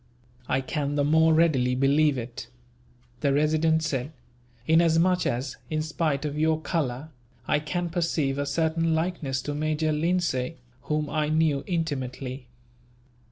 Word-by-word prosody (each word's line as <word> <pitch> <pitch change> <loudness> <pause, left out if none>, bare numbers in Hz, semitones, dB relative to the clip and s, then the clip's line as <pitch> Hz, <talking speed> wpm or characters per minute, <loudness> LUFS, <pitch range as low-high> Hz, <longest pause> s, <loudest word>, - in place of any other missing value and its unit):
"I 130 - +1
can 145 +2 -2
the 145 - +2
more 160 +2 +4
readily 150 -6 +3
believe 140 +2 +3
it," 120 -1 -6 0.7
the 140 - +1
Resident 155 +2 +2
said, 145 -3 -2 0.5
"inasmuch 165 +3 +3
as, 125 +4 -3
in 155 -1 -1
spite 155 -2 -1
of 150 0 -3
your 160 0 +2
colour, 150 -3 -2 0.4
I - - +2
can 175 +3 -2
perceive 160 -5 -1
a 145 - -1
certain 165 +2 +1
likeness 160 -6 -2
to 145 - -3
Major 155 +1 0
Lindsay, 165 -3 0 0.3
whom 150 0 -1
I 150 0 -1
knew 155 -3 +2
intimately." 135 -6 -3
155 Hz, 135 wpm, -26 LUFS, 140-160 Hz, 0.7 s, more